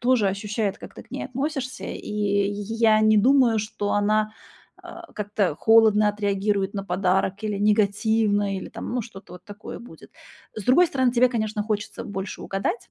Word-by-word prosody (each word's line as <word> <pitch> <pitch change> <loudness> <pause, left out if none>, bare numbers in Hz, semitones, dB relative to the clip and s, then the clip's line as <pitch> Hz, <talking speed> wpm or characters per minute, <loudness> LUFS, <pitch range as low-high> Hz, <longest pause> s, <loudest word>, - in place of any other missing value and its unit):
тоже 245 -4 +2
ощущает, 205 +1 -2
как - - -11
ты - - -10
к - - -29
ней - - -4
относишься. 265 -1 -4
И - - -5
й 205 +1 -1
я 220 -2 +4
не 215 0 +4
думаю, 240 0 +4
что 205 -1 -3
она, 215 +1 +1 0.5
а, 345 0 -11
как-то 205 -5 -1
холодно 220 -1 +5
отреагирует 205 -1 -1
на 195 -1 -4
подарок 190 +2 0
или 210 -2 -2
негативно, 205 -1 +1
или 190 - -6
там, - - -7
ну, 245 - -1
что-то 195 -4 -12
вот 180 - -14
такое 205 0 -9
будет. 240 - -14 0.4
С 215 - -7
другой 345 +8 +5
стороны, 260 -5 +1
тебе, 250 +1 +4
конечно, 215 -3 -2
хочется 210 -1 -4
больше 195 -1 -6
угадать. 195 - -3
210 Hz, 170 wpm, -24 LUFS, 200-225 Hz, 0.5 s, холодно